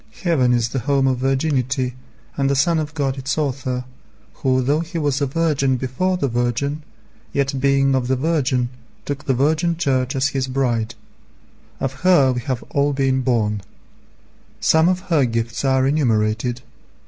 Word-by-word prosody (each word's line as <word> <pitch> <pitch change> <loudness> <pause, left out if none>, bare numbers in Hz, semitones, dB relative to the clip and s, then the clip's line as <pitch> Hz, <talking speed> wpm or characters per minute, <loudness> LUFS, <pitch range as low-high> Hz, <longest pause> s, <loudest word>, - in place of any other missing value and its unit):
Heaven 145 -9 +3
is 120 -2 +1
the 135 - -2
home 140 +1 +1
of 130 -2 +1
virginity, 130 -1 0 0.4
and 135 -1 +1
the 140 - +2
Son 160 +4 +2
of 150 0 -4
God 135 -3 -1
its 135 +1 -2
Author, 130 -4 -2 0.6
Who 130 -3 +2
though 145 +4 +2
He 170 +1 -5
was 145 -3 0
a 140 - +2
Virgin 140 -3 +1
before 135 +10 -1
the 140 - 0
Virgin, 120 +5 -1 0.5
yet 135 -1 0
being 135 0 +3
of 130 -2 0
the 130 - +2
Virgin 130 -4 0 0.4
took 145 +1 -4
the 135 - +1
Virgin 160 +5 +1
Church 130 -5 0
as 135 +2 +2
His 135 -2 -2
bride. 120 -3 -1 0.8
Of 135 -1 -2
her 175 -8 +5
we 125 - -3
have 130 -1 -3
all 140 0 +1
been 135 -1 +1
born. 110 -5 0 1.0
Some 160 +2 +4
of 185 0 0
her 150 -4 +4
gifts 115 0 -2
are 130 -1 +2
enumerated. 120 -4 +1
135 Hz, 165 wpm, -21 LUFS, 125-145 Hz, 1.0 s, her